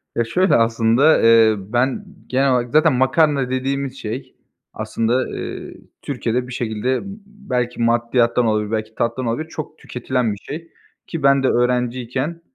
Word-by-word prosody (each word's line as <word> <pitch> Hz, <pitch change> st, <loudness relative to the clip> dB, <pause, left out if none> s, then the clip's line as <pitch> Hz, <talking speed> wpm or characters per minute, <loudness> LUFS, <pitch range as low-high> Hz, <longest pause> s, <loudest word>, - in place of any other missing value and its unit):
Ya, 120 Hz, -, +2 dB
şöyle 185 Hz, +12 st, +2 dB
aslında, 115 Hz, +6 st, +3 dB
eee, 115 Hz, -1 st, +6 dB
ben 120 Hz, -, -1 dB, 0.2 s
genel 135 Hz, +1 st, +2 dB
olarak 125 Hz, -1 st, 0 dB
zaten 155 Hz, 0 st, +4 dB
makarna 135 Hz, +1 st, +2 dB
dediğimiz 135 Hz, +1 st, -2 dB
şey 115 Hz, +5 st, -6 dB, 0.4 s
aslında, 120 Hz, +3 st, -1 dB
eee, -, -, -6 dB, 0.3 s
Türkiye'de 125 Hz, -2 st, -2 dB
bir 125 Hz, -, -8 dB
şekilde, 120 Hz, +1 st, -1 dB
ımm, 200 Hz, +2 st, -8 dB
belki 125 Hz, -, -4 dB
maddiyattan 120 Hz, +1 st, +2 dB
olabilir, 105 Hz, -1 st, 0 dB
belki 110 Hz, 0 st, -3 dB
tattan 120 Hz, +2 st, -1 dB
olabilir, 120 Hz, +8 st, -2 dB
çok 155 Hz, 0 st, -7 dB
tüketilen 125 Hz, -3 st, -2 dB
bir -, -, -8 dB
şey 160 Hz, +10 st, -8 dB, 0.4 s
ki 165 Hz, -4 st, -5 dB
ben 140 Hz, -1 st, +4 dB
de 130 Hz, -, +3 dB
öğrenciyken, 125 Hz, +5 st, -1 dB
125 Hz, 150 wpm, -20 LUFS, 115-140 Hz, 0.4 s, eee